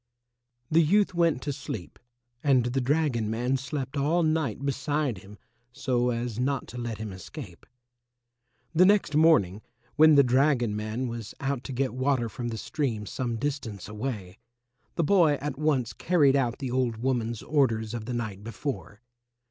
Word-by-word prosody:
The 165 +2 +6
youth 195 +5 +3
went 170 -6 +2
to 145 - -2
sleep, 120 - -7 0.4
and 130 -4 +4
the 125 +2 0
dragon 130 -5 +1
man 120 +4 0
slept 135 +1 -4
all 155 +5 +2
night 155 -6 0
beside 140 -3 -1
him 100 +3 -14 0.3
so 125 -1 0
as 120 -1 -3
not 135 0 0
to 125 - -7
let 120 -2 -4
him 105 -2 -6
escape. 95 -2 -10 1.1
The 170 +3 +5
next 200 -7 +3
morning, 150 - +4 0.4
when 155 0 +7
the 140 - +7
dragon 125 -3 +2
man 110 +4 -3
was 115 -3 -6
out 135 -2 -2
to - - -5
get 130 0 -1
water 130 -2 0
from 120 +2 -5
the 115 -1 -4
stream 115 -4 -2
some 120 +3 -3
distance 115 -7 -4
away, 105 -4 -5 0.6
the 170 - +1
boy 165 -2 +4
at 145 -1 -4
once 135 -7 +1
carried 145 - +3
out 125 -3 +1
the 135 -4 -4
old 125 -3 0
woman's 120 -2 -1
orders 115 -7 +1
of 115 -2 -4
the 125 - -4
night 105 -4 -4
before. 115 -1 -5
130 Hz, 165 wpm, -27 LUFS, 115-145 Hz, 1.1 s, when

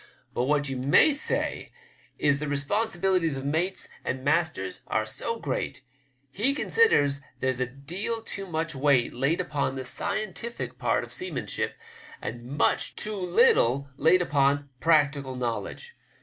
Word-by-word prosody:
But 125 - 0
what 145 +1 +1
ye 135 - -3
may 135 - +5
say 285 - -1 0.5
is 140 -1 +2
the 150 - -3
responsibilities 175 +1 +1
of 135 - -6
mates 165 +6 -1 0.2
and 130 0 -3
masters 145 - 0
are 110 - 0
so 170 - -2
great, 135 -2 -3 0.5
he 250 - +1
considers 145 - +3 0.2
there's 130 -1 0
a 130 - 0
deal 175 - -5
too 195 -3 -5
much 165 -1 -2
weight 140 -3 +2
laid 140 +8 +1
upon 145 -6 -1
the 130 -1 -5
scientific 215 - -4
part - - +1
of - - -8
seamanship* 370 0 -3 0.4
and 120 - -6
much - - +2
too 215 - -4
much - - -3
too - - -9
little 140 - +4
laid 165 +6 +4
upon 140 -2 +1
practical 145 -4 +2
knowledge. 125 - -4
145 Hz, 150 wpm, -27 LUFS, 135-190 Hz, 0.5 s, may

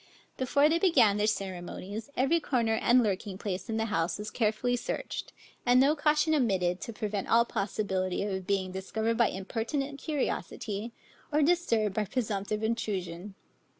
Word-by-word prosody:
Before 280 +3 +3
they 330 +2 +2
began 250 - +4
their 210 +1 +2
ceremonies, 195 +3 -4
every 275 +6 +3
corner 235 -7 +1
and 245 +1 +5
lurking 200 -1 -2
place 195 +1 -4
in 220 - -1
the 225 - 0
house 165 -5 0
was 210 +1 -6
carefully 230 +2 +1
searched, 245 - -4 0.3
and 245 0 +5
no 280 +4 +5
caution 300 +1 +2
omitted 190 - +1
to - - -5
prevent 210 -2 -3
all 235 +1 +5
possibility 195 -4 -1
of 190 -3 -3
being 190 -2 0
discovered 220 +4 -2
by 235 - +6
impertinent 260 +9 -3
curiosity, 235 -7 -3 0.4
or 300 0 +3
disturbed 280 - +2
by 210 +1 0
presumptive 210 -2 -2
intrusion. 195 -4 -3
220 Hz, 150 wpm, -29 LUFS, 195-255 Hz, 0.4 s, by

